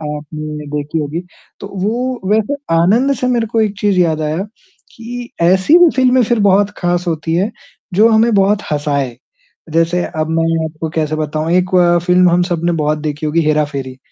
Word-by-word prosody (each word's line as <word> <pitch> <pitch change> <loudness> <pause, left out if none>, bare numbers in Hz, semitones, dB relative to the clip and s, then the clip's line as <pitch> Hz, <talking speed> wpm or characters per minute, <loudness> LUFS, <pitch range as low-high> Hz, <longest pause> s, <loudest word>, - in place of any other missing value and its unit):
आपने 150 0 -7
देखी 150 +2 -3
होगी, 155 +3 -3 0.4
तो 200 - -7 0.2
वो 245 +4 -2
वैसे 220 +6 +1 0.2
आनंद 220 +12 +3
से 250 - -2
मेरे 240 -2 0
को 225 0 0
एक 210 -2 0
चीज़ 200 -3 +1
याद 160 -3 +1
आया 155 +4 -2 0.5
कि 240 +1 -7
ऐसी 190 - +4
भी 350 -2 +6
फ़िल्में 255 -1 +3
फिर 235 +1 0
बहुत 200 +1 +3
ख़ास 175 0 -1
होती 160 -1 -2
हैं 195 +6 0 0.4
जो 210 +5 +5
हमें 225 +1 +3
बहुत 200 +1 +2
हँसाए, 140 -4 -1 0.6
जैसे 165 +2 +1
अब 155 0 -3
मैं 165 0 0
आपको 160 +1 -5
कैसे 155 -1 -1
बताऊँ, 155 +1 -2
एक 180 0 +2 0.4
फ़िल्म 180 0 +4
हम 175 - +3
सबने 175 -1 -1
बहुत 150 +1 0
देखी 150 0 -4
होगी, 155 +2 +1
हेरा-फेरी, 145 -4 -1
175 Hz, 175 wpm, -15 LUFS, 155-210 Hz, 0.6 s, भी